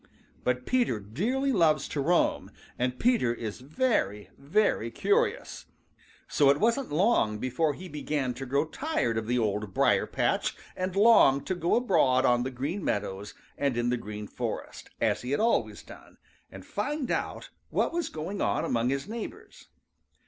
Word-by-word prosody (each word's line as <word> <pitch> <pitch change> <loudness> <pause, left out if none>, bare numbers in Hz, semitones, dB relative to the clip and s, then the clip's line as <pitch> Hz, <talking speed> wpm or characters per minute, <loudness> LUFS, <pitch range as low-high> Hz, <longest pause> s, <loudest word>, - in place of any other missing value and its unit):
But 125 0 -1
Peter 245 - +1
dearly 220 - -1
loves 160 - +3
to 145 - -2
roam, 175 +5 +1 0.3
and 125 0 -1
Peter 235 - +2
is 115 0 -6
very, 140 - -1
very 140 - +1
curious, 425 - 0 0.6
so 140 -2 +3
it 140 +1 +4
wasn't 235 - +1
long 155 - +2
before 135 +6 0
he 185 +5 -9
began 145 -5 -2
to 130 +2 -7
grow 140 +4 +1
tired 160 - -1
of 110 -1 -2
the 125 +1 +1
Old 105 -3 -1
Briar - - +3
patch - - 0 0.2
and 185 0 -3
long 200 -11 +6
to - - -2
go 175 -1 +1
abroad 155 - +3
on 120 -1 +3
the 130 - -2
Green 140 +10 -4
Meadows 100 0 -3 0.2
and 140 -4 0
in 120 0 +1
the - - +2
Green 105 -2 -7
Forest - - -6
as - - +1
he 130 +3 -1
always 230 +8 +1
had - - -21
done, - - -14 0.3
and - - -11
find 295 -3 -3
out - - -3 0.2
all - - +1
that - - -1
was 345 0 -1
going 170 +6 -5
on - - 0
among 120 0 0
his 140 +1 -2
neighbors. 230 +1 -8
140 Hz, 170 wpm, -28 LUFS, -, 0.6 s, long